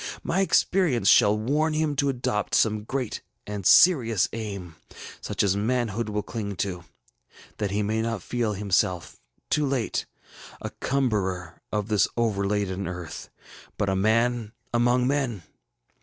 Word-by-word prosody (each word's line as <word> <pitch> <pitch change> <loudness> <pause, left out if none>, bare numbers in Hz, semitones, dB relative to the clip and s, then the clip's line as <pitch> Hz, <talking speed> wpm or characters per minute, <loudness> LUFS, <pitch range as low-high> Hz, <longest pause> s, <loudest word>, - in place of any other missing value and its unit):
My 180 - 0
experience 180 -8 +2
shall 105 +1 +6
warn 150 +8 0
him 155 -1 0
to 140 0 +2
adopt 120 -5 -1
some 110 -1 +2
great 130 -2 -3 0.2
and 105 -3 -3
serious 120 - +5
aim, 100 -7 -6 0.4
such - - -1
as 100 -1 +2
manhood 115 0 -1
will 105 0 -2
cling 105 -2 -5
to, 90 -3 -3 0.7
that 105 -2 -1
he 105 +2 0
may 110 +2 0
not 115 -4 -3
feel 120 -3 -1
himself, 95 -3 0 0.3
too 150 - +2
late, 130 -4 -1 0.5
a - - -6
cumberer 95 -10 -2
of 105 -1 -1
this 105 -2 +3
overladen 100 -3 0
earth, 90 -3 -7 0.5
but 100 - 0
a 95 - +1
man 110 +2 +1 0.2
among 120 +1 +3
men. 130 -8 -1
110 Hz, 140 wpm, -26 LUFS, 100-125 Hz, 0.7 s, shall